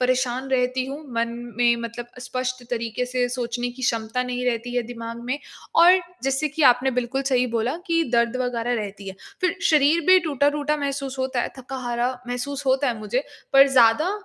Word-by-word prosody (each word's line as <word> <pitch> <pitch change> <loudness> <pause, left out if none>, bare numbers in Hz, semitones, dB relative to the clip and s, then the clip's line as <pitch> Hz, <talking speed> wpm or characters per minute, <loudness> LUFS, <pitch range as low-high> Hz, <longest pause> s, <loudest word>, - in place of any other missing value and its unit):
परेशान 255 +1 0
रहती 255 0 +1
हूँ, 275 +2 -5 0.2
मन 230 0 +1 0.3
में 240 -1 +4
मतलब 235 +1 -6
स्पष्ट 255 0 -3
तरीक़े 235 0 -2
से 250 0 0
सोचने 245 -1 -2
की 250 +2 -11
क्षमता 230 +1 0
नहीं 250 0 -3
रहती 245 0 -1
है 245 - +2
दिमाग 230 0 -7
में। 255 +4 -2 0.4
और 360 +2 +7 0.2
जैसे 270 +3 0
कि 305 +2 -3
आपने 255 +2 -2
बिल्कुल 250 +2 -1
सही 255 -2 +2
बोला 235 +6 0
कि 330 -1 +2
दर्द 235 +1 +2
वग़ैरह 245 -1 -1
रहती 200 -1 -8
है। 190 - -7 0.3
फिर 370 0 +1
शरीर 305 +2 +4
भी 370 0 +8
टूटा-टूटा 295 -1 +1
महसूस 275 -2 -3
होता 260 -1 -1
है, - - -4
थका-हारा 250 -1 -2 0.2
महसूस 270 +3 -4
होता 265 +1 +2
है 230 -3 -2
मुझे, 230 +6 -1 0.3
पर 275 0 +7
ज़्यादा 260 +7 +4
250 Hz, 180 wpm, -23 LUFS, 240-275 Hz, 0.4 s, भी